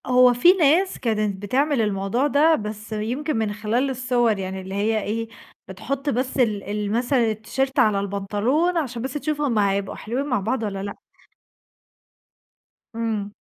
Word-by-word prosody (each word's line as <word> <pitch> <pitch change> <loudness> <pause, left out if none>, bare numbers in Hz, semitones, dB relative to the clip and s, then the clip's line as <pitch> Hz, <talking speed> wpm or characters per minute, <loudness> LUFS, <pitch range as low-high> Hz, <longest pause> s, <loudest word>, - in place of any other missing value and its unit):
هو 250 0 +6
في 295 +10 +6
ناس 360 +2 +2
كانت 215 -4 -1
بتعمل 270 +4 +1
الموضوع 210 +5 0
ده، 305 +3 +4
بس 215 -1 -6
يمكن 245 +7 -2
من 215 -2 -1
خلال 225 +6 0
الصور 245 -4 +1
يعني 190 0 -4
اللي 190 +1 -7
هي 215 +2 +1
إيه 225 +2 -3 0.4
بتحط 275 +1 -4
بس 255 +1 -1
ال 215 -6 +1
ال 205 0 -3
مثلًا 240 0 +2
التيشيرت 260 +5 -2
على 210 -2 +4
البنطلون 205 - 0
عشان 255 -7 -2
بس 260 +1 -4
تشوفهم 295 -5 -1
هيبقوا 200 -1 0
حلوين 250 +6 -3
مع 250 -5 0
بعض 225 +4 -2
والّا 195 -2 -3
لأ. 200 - -5 2.0
إمم. 220 -3 -2
230 Hz, 150 wpm, -23 LUFS, 205-270 Hz, 2.0 s, هو